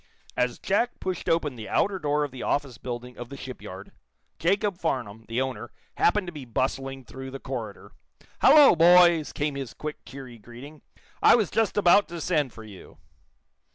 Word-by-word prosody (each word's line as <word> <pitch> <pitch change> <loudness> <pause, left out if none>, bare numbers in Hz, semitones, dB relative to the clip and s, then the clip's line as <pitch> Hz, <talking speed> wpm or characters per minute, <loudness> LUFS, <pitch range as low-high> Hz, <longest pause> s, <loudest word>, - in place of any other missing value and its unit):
As 125 -1 0
Jack 235 +5 -1
pushed 185 -2 -4
open 155 -5 0
the 110 -2 -8
outer 195 -1 +1
door 150 -2 0
of 145 - -4
the 130 -2 -9
office 135 -5 -2
building 125 0 -7
of 120 -1 -7
the 140 - -9
shipyard, 130 -1 -9 0.5
Jacob 195 +2 0
Farnum, 115 - -3
the 115 +2 -2
owner, 130 -2 -3 0.3
happened 205 +2 +2
to 175 - -7
be 150 -3 -8
bustling 135 +2 -3
through 130 +2 -9
the 135 +1 -8
corridor. 115 -7 -7 0.5
"Hallo, 290 -3 +7
boys!" 170 -1 +5
came 145 0 -2
his 135 -4 -6
quick, 150 0 -7
cheery 130 -4 -11
greeting. 130 +7 -12 0.4
"I - - +7
was 220 -7 0
just 225 -2 0
about 200 +1 +5
to 170 0 -7
send 150 -5 0
for 110 - -12
you." 100 -4 -13
140 Hz, 175 wpm, -26 LUFS, 125-175 Hz, 0.5 s, Hallo